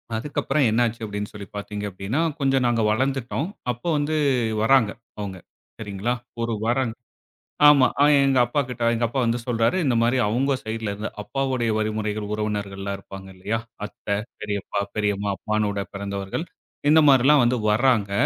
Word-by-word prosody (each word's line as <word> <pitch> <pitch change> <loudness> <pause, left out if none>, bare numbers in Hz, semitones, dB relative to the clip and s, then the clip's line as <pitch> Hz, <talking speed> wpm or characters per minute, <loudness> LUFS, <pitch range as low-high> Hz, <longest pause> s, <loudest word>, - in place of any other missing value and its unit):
அதுக்கப்புறம் 140 +3 0
என்னாச்சு 115 +1 +1
அப்டின்னு 105 0 -5
சொல்லி 100 -2 -8
பார்த்திங்க 105 0 -5
அப்டின்னா, 100 - -2 0.2
கொஞ்சம் 135 -2 +2
நாங்க 120 -2 +2
வளர்ந்துட்டோம். 135 +5 -1 0.2
அப்போ 120 +8 -7
வந்து 150 +2 0 0.5
வராங்க 115 -3 +4 0.3
அவுங்க, 95 -2 -5 0.4
சரிங்களா? 105 +2 -2 0.3
ஒரு 115 -1 -1
வரன். 120 -1 +1 0.7
ஆமா 140 -3 +7 0.4
எங்க 135 -2 +3
அப்பாக்கிட்ட 125 -2 -2
எங்க 115 +1 0
அப்பா 130 +3 -2
வந்து 115 +1 +1
சொல்றாரு 115 +7 +1
இந்த 125 -4 +2
மாதிரி 120 +3 +2
அவங்க 135 +5 +1
சைடிலருந்து, 110 -1 -4
அப்பாவுடைய 130 -2 -1
வழிமுறைகள் 105 -1 -2
உறவினர்கள் 105 -2 -3
எல்லாம் 100 0 -3
இருப்பாங்க 95 -1 -10
இல்லையா? 105 +5 -2 0.3
அத்தை, 100 0 -4 0.3
பெரியப்பா, 100 0 -3 0.2
பெரியம்மா, 105 -1 0
அப்பானோட 105 -2 -1
பிறந்தவர்கள் 100 - -4 0.4
இந்த 160 +1 +7
மாரிலாம் 135 +1 +6
வந்து 125 +1 +2
வராங்க. 110 -3 +2
115 Hz, 140 wpm, -24 LUFS, 105-130 Hz, 0.7 s, ஆமா